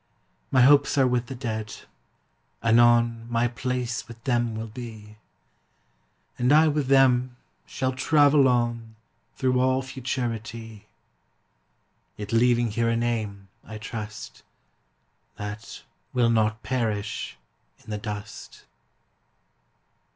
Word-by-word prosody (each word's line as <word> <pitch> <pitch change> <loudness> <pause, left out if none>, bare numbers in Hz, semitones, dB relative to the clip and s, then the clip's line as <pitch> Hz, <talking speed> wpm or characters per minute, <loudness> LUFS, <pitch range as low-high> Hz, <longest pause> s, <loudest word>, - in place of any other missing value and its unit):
My 130 - +4
hopes 140 +2 +5
are 135 - +5
with 125 -1 0
the 135 - -6
Dead; 110 -4 -4 0.9
anon 115 0 +4
My 120 0 +1
place 120 -1 -3
with 115 0 -13
them 120 -3 0
will 110 +1 -4
be, 110 -2 -10 1.2
And 125 +2 +2
I 155 +2 +6
with 145 -2 -1
them 130 -2 +4 0.3
shall 130 -1 -2
travel 145 +1 +4
on 120 -2 -1 0.4
Through 130 -1 +1
all 130 +1 +2
Futurity; 115 -4 -5 1.3
Yet 105 +1 -6
leaving 120 0 +3
here 115 +2 0
a 115 - +1
name, 110 -4 -2 0.2
I 110 - -9
trust, 105 -1 -7 0.9
That 105 +2 -8 0.3
will 120 -2 +3
not 110 -1 +1
perish 110 - -3 0.5
in 110 - -10
the 105 - -3
dust. 105 0 -8
120 Hz, 110 wpm, -25 LUFS, 110-125 Hz, 1.3 s, I